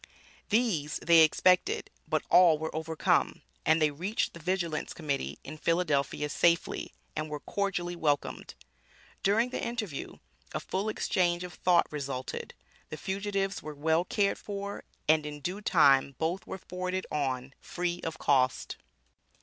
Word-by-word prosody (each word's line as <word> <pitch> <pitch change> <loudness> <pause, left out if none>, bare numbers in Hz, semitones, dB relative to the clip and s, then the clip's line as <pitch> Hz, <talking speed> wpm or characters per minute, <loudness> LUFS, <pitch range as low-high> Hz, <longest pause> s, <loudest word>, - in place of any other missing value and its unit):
These 205 -10 +1
they 170 -1 +7
expected, 185 - +3 0.2
but - - 0
all 175 -4 +7
were 160 +1 -5
overcome, 160 0 0 0.2
and 160 +1 +5
they 155 -1 +3
reached 185 +10 -2
the 170 - -10
Vigilance 170 -2 -2
Committee, 145 -4 -2
in 155 +2 -9
Philadelphia 150 -4 +1
safely, 170 +3 +1 0.2
and 155 0 -3
were 150 -1 -4
cordially 180 -3 -2
welcomed. 145 -4 -1 0.7
During 225 +5 +2
the - - -3
interview, 215 - -4 0.4
a - - 0
full 195 +3 -2
interchange 175 -4 +1
of 180 -1 -7
thought 175 -2 +3
resulted, 135 -3 -5 0.3
the 155 - -6
fugitives 195 +1 -2
were 155 -1 -7
well 160 +3 +2
cared 200 +2 0
for, 200 0 -6 0.2
and 155 0 +4
in 150 0 -6
due 180 +8 -4
time 140 -7 +4
both 170 +4 -2
were - - -5
forwarded 185 +1 -4
on, 130 -3 -2
free 175 0 -3
of 160 -1 -4
cost. 130 -2 +1
170 Hz, 140 wpm, -30 LUFS, 150-190 Hz, 0.7 s, they